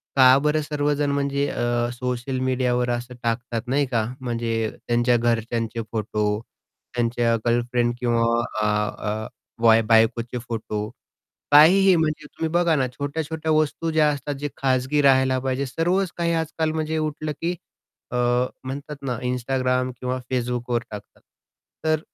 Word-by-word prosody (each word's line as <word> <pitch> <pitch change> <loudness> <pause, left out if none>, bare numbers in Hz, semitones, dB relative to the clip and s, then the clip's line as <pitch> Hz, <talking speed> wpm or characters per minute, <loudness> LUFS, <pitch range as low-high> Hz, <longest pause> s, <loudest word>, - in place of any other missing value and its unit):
का 130 -1 +7
बरं 150 +1 +2
सर्वजण 145 -1 0
म्हणजे 140 0 0
अ, 120 0 0
सोशल 125 +1 -3
मीडियावर 125 -1 0
असं 120 +1 -3
टाकतात 115 0 -1
नाही 140 +2 +2
का 115 -4 0
म्हणजे 115 -3 -1 0.2
त्यांच्या 120 0 +3
घरच्यांचे 115 0 -1
फोटो 105 -1 -1 0.6
त्यांच्या 120 -1 +1
गर्लफ्रेंड 120 0 +1
किंवा 120 -2 +1 0.4
अ, - - +1
अ, 105 0 -1 0.3
वाय 115 -1 +6
बायकोचे 115 +2 +2
फोटो. 110 -3 -4 0.6
काहीही 185 +6 +7
म्हणजे 155 -2 -1
तुम्ही 160 +2 -4
बघा 170 -1 +3
ना 130 -2 +1
छोट्या-छोट्या 155 +4 -3
वस्तू 155 +1 +1
ज्या 155 -1 +3
असतात 145 0 -3
जे 145 - -2
खाजगी 130 +2 +1
राहायला 130 -1 +4
पाहिजे. 130 +1 -1
सर्वच 175 +7 0
काही 170 -1 0
आजकाल 160 -1 -1
म्हणजे 160 0 -1
उठलं 155 0 -2
की 175 +2 -1 0.6
अ, 125 - -3 0.5
म्हणतात 140 +3 -6
ना 125 -3 -2
Instagram 125 0 0
किंवा 130 0 -2
Facebookवर 120 -1 -1
टाकतात. 105 -1 -10 0.6
तर 155 -1 +2
130 Hz, 135 wpm, -23 LUFS, 120-150 Hz, 0.6 s, का